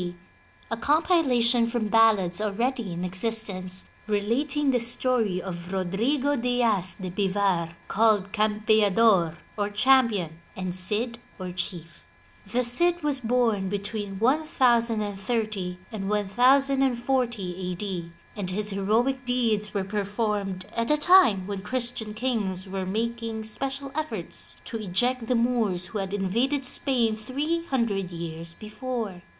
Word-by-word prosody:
D., 175 0 -4 0.6
a 230 - -1
compilation 255 -6 +3
from 230 -2 -1
ballads 210 -5 +4
already 230 +1 -1
in 175 +1 -3
existence, 185 -1 -2 0.2
relating 265 +8 +1
the 250 - +2
story 235 -4 +1
of 175 -1 -6
Rodrigo 230 +10 0
Diaz 230 -7 +1
de 185 -3 -6
Bivar, 190 -3 0
called 205 -3 +3
Campeador 210 -4 +3 0.2
or 205 -1 -1
Champion 210 -8 +2 0.2
and 185 -1 -3
Cid 215 +6 -2 0.2
or 185 -1 -5
Chief. 175 -2 -6 0.5
The 250 +1 +1
Cid 345 +8 +2
was 290 -2 0
bom 225 -5 +1
between 205 0 -4
1030 225 - +1
and 200 -3 -4
1040 240 -3 +1
A. - - -3
D. 180 -3 -4 0.2
and 200 -4 -3
his 210 +3 -1
heroic 225 +7 +1
deeds 225 -4 0
were 200 - +1
performed 205 -1 -2
at 230 0 -1
a 300 - +4
time 295 - +5
when 200 -1 -4
Christian 235 -1 -3
kings 210 -6 -1
were 190 -1 -4
making 225 +2 -2
special 270 +5 -3
efforts 310 +1 -2
to 230 - -4
eject 225 +5 0
the 250 - +2
Moors 230 -7 +1
who 215 - -3
had 195 -1 -3
invaded 235 +8 0
Spain 245 -4 +2
three 290 +10 -2
hundred 210 -8 0
years 170 0 -6
before. 215 -3 -5
215 Hz, 125 wpm, -26 LUFS, 190-245 Hz, 0.6 s, time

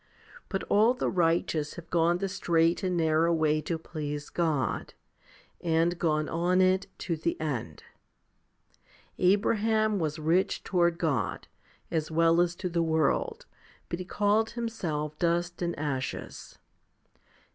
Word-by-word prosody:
But 195 - -2
all 220 +5 +3
the - - -1
righteous 165 -3 +1
have 170 - -11
gone 170 0 +3
the 195 +2 -2
straight 170 -3 +1
and 180 -2 -1
narrow 160 +1 +3
way 155 -2 +2
to 165 +2 -2
please 150 -2 -6
God, 155 -8 -1 0.7
and 165 +1 +1
gone 155 -2 +1
on 175 +2 +1
it 185 +1 +3 0.2
to 170 - 0
the 165 +2 -2
end. 125 - -4 1.4
Abraham 215 +2 +2
was 155 -2 -2
rich 175 +5 +1
toward 175 -2 +2
God, 135 - -1 0.4
as 160 -2 -1
well 165 +1 +4
as 175 0 0
to 185 - -4
the 170 -1 0
world, 165 - 0 0.4
but 170 - -3
he 185 - -5
called 210 +3 +1
himself 165 -11 -4
dust 175 +1 0
and 170 -1 -2
ashes.' 140 -3 -4
170 Hz, 135 wpm, -28 LUFS, 155-185 Hz, 1.4 s, well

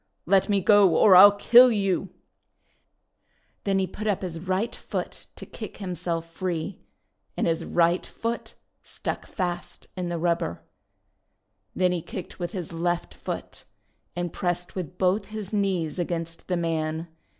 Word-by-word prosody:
:' - - -50
Let 195 +4 +3
me 200 -1 +2
go 200 -4 +5
or 200 -4 +7
I 185 +2 +12
'11 205 0 +5
kill 245 +3 +8
you! 195 -3 0 0.7
' - - -45
Then 195 -1 +2
he 190 - +2
put 215 +4 -6
up 200 -2 0
his 170 -3 -4
right 185 +6 -1
foot - - -6
to - - -9
kick - - -9
him 190 -3 -4
self 165 -1 -3
free. 175 +1 -4 0.6
And - - +1
his 165 -1 0
right 170 +1 +2
foot 230 +1 -5 0.3
stuck - - -5
fast 175 -2 -4
in 180 -2 -3
the 170 - -2
rubber. 165 - -1 1.1
Then 185 -1 +2
he 175 -2 -1
kicked 185 +4 -8
with 175 -1 -3
his 175 -4 -5
left 175 +1 -1
foot, - - -7 0.5
and 175 -1 -3
pressed 175 -1 -2
with 180 -1 -6
both 190 +2 +2
his 215 -2 -7
knees 190 -5 0
against 165 -1 -3
the 180 - 0
man. 160 -1 -2
180 Hz, 160 wpm, -26 LUFS, 170-195 Hz, 1.1 s, I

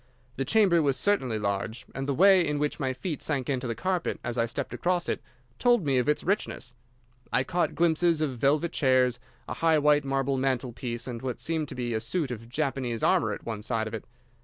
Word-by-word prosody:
The 135 - -2
chamber 190 -2 +4
was 140 -3 +1
certainly 130 - +1
large, 100 +2 -3
and 135 +1 -4
the 140 - +1
way 190 +3 +6
in 150 -2 -1
which 150 +2 -1
my 135 -3 0
feet 155 +4 -4
sank 140 -3 -1
into 130 -1 -2
the 115 - -2
carpet 185 +2 -1
as 120 - -3
I 115 -1 +1
stepped 115 - -4
across 175 +8 0
it - - -2 0.4
told 240 -7 +3
me 135 -3 +2
of 125 - 0
its 150 - +1
richness. 185 - -2 0.6
I - - +2
caught 175 +4 -1
glimpses 170 0 +3
of 150 -4 -1
velvet 145 +7 +1
chairs, 130 -3 +2 0.3
a - - -3
high 165 -1 +3
white 150 0 +4
marble 135 0 0
mantel 130 -2 0
piece, 120 -1 -5
and 120 -3 -5
what 130 -2 -4
seemed 160 -2 -2
to - - -7
be 120 -2 -2
a 110 - 0
suit 150 +2 -2
of 115 -1 -7
Japanese 130 -4 -2
armour 110 - +3
at - - -8
one 110 -2 -4
side 110 0 -1
of 110 - -8
it. 110 - -5
135 Hz, 220 wpm, -27 LUFS, 120-160 Hz, 0.6 s, way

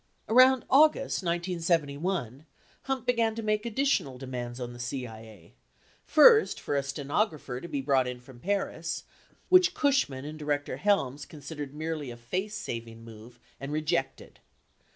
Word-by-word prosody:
80 - - -2
Around 255 0 +6
August 290 -3 +4
1971, 170 - -1 0.4
Hunt 265 -3 -2
began 230 -3 +1
to 225 - -5
make 215 +1 0
additional 235 - 0
demands 125 -2 -6
on 120 -1 -5
the 120 - -11
CIA: 115 -7 -7 0.5
first, 435 +8 +6
for 145 - -3
a 140 - +2
stenographer 140 - -2
to - - -7
be 145 -4 -3
brought 135 -2 +2
in 125 0 -5
from 125 0 -15
Paris, 170 -1 -2 0.5
which 365 0 +5
Cushman 205 - +1
and 155 +1 -7
Director 145 -1 -2
Helms 145 -9 0
considered 145 -1 -8
merely 155 -3 -4
a 120 - -8
face 185 - -4
saving 115 - -6
move 115 +2 -13 0.2
and 140 +1 -6
rejected. 155 -3 -2
150 Hz, 145 wpm, -28 LUFS, 125-205 Hz, 0.5 s, Around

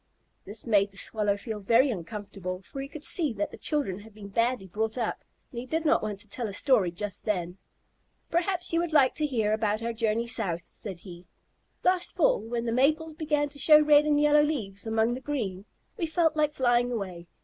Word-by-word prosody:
This 205 +3 -4
made 205 -3 +3
the 195 - -16
Swallow 205 -1 0
feel 215 0 -5
very 235 +7 +4
uncomfortable, 195 -1 -6
for 270 - -7
he 275 - -5
could 295 +1 -10
see 305 -7 0
that 305 - -3
the - - -8
children 280 - 0
had 210 0 -14
been 205 -2 -10
badly 230 +1 0
brought 220 +5 -3
up, 235 -3 -2 0.3
and 240 - -5
he 250 - -7
did 320 +4 -1
not 300 - +4
want 210 -2 -4
to 210 - -12
tell 230 +3 -3
a 200 - -6
story 220 -4 +3
just 200 +3 -6
then. 180 -3 -2 0.7
"Perhaps 355 +1 -1
you 335 - +3
would 340 -2 -2
like 275 -4 +5
to 305 0 0
hear 220 -6 0
about 215 0 0
our 235 0 -2
journey 225 0 0
south," 195 -8 -1
said 190 -2 -8
he. 175 -2 -12 0.6
"Last 365 0 +1
fall, - - +3
when 235 +1 -3
the 230 - -1
maples 310 +6 +2
began 300 -2 0
to 285 0 -13
show 300 +2 +8
red 300 0 +5
and 295 -1 +3
yellow 295 0 +5
leaves 225 -10 -2
among 225 +1 +1
the 255 - -5
green, 205 -10 -3 0.3
we 340 -6 -1
felt 320 -1 +2
like 300 -1 +1
flying 245 -1 +2
away. 185 -7 -5
235 Hz, 215 wpm, -28 LUFS, 205-295 Hz, 0.7 s, show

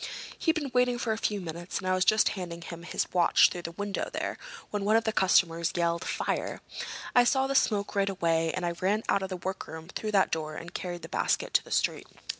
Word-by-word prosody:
"He'd 325 - +1
been 290 -5 -3
waiting 250 -1 +3
for 235 -2 0
a - - -4
few 210 -2 0
minutes 175 0 -5
and 185 - -4
I 185 - +3
was 185 0 +3
just 215 +2 +4
handing 175 -3 -6
him 170 0 -8
his 170 - -2
watch 175 -2 +5
through 175 - -5
the 170 -1 -6
window 205 +2 -3
there - - -3 0.3
when 210 -1 -2
one 210 +2 +3
of 225 - +4
the 220 - 0
customers 170 -4 +3
yelled 170 -1 +1
'Fire!' - - -2 0.6
I 245 - +8
saw 265 +2 +3
the 275 - -1
smoke 210 -6 +2
right 200 0 +1
away, 165 -3 +1
and 185 - -3
I 170 - 0
ran 195 +5 0
out - - +3
of 190 - -3
the 185 - -4
workroom 170 -3 -6
through 215 +2 -4
that 195 -2 +4
door 155 -1 -2
and 170 +2 -8
carried 175 -2 -5
the - - -6
basket - - 0
to - - +4
the - - -14
street." - - 0
185 Hz, 235 wpm, -29 LUFS, 170-210 Hz, 0.6 s, I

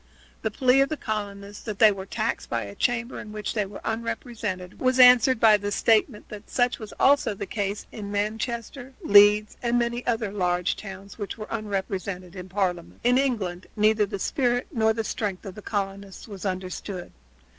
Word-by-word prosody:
The 220 - 0
plea 255 +4 +3
of 275 - +2
the 310 - -3
colonists 205 -2 -5
that 215 -3 -4
they 215 0 +7
were 195 -1 -6
taxed 220 +2 -2
by 115 -1 -1
a 100 - -8
chamber 240 - -1
in 210 - -9
which 210 -1 -4
they 210 -3 -1
were 195 - -10
unrepresented 225 -5 -4
was 255 0 +2
answered 250 0 +7
by 220 -2 +6
the 205 0 -4
statement 220 +1 +2
that 210 0 -10
such 245 0 +1
was 215 -2 -8
also 275 -6 +4
the 200 - -5
case 200 0 -3
with 210 - -7
Manchester, 230 +5 -3
Leeds, 205 +1 +6
and 240 0 +1
many 240 0 -1
other 225 -4 0
large 180 -3 0
towns 195 +1 -10
which 205 +1 -5
were 215 - -6
unrepresented 195 -4 -4
in 185 0 -8
Parliament. 180 -3 -2
In 245 +2 +4
England 200 -10 -1
neither 215 -1 +3
the 200 0 -4
spirit 245 +4 0
nor 220 -5 +2
the 225 0 -2
strength 205 -3 -3
of 195 - -6
the 210 - -10
colonists 200 -1 -4
was 200 -2 -5
understood. 185 0 -5
210 Hz, 185 wpm, -25 LUFS, 195-235 Hz, -, they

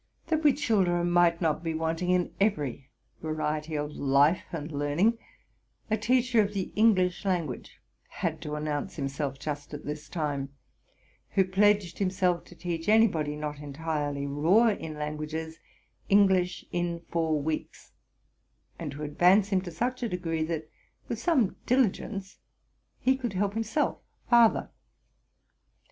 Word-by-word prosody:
That 315 -1 +1
we 295 -2 +6
children 180 - +1
might 175 -1 +4
not 160 -1 0
be 165 -1 -2
wanting 165 +2 -1
in 180 -1 +1
every 145 - 0 0.3
variety 155 0 -2
of 150 0 -2
life 140 +4 +3
and 160 -1 -5
learning, 150 +11 +1 0.7
a - - +4
teacher 245 +1 +3
of 205 0 -2
the 190 -2 -2
English 190 -5 +3
language 175 -9 -3 0.3
had - - -3
to 150 0 -4
announce 150 -1 -3
himself 140 -2 -3
just 145 +1 -5
at 145 - -9
this 150 0 -6
time, 145 -4 -2 0.8
who 190 - +4
pledged 195 -1 +2
himself 185 -2 +1
to 175 - -15
teach 170 0 -3
anybody 180 -10 +3
not 150 -1 -5
entirely 145 -1 -3
raw 165 +12 +4
in 160 -7 -4
languages, 155 +2 -5 0.5
English 190 -3 +3
in 175 -1 -2
four 160 -2 +1
weeks, 155 +2 -4 0.9
and 150 -4 -5
to 150 +2 -7
advance 180 +7 +4
him 190 -2 +2
to 185 - -7
such 250 +9 -2
a 235 - -1
degree, 165 -3 -2
that, 160 -1 -2 0.4
with 230 - -3
some 260 - +2
diligence, 210 -5 0 0.6
he 260 +1 +2
could 245 -5 -4
help 200 +1 0
himself 225 +7 -1 0.3
farther. 235 -2 +4
170 Hz, 140 wpm, -28 LUFS, 150-200 Hz, 0.9 s, we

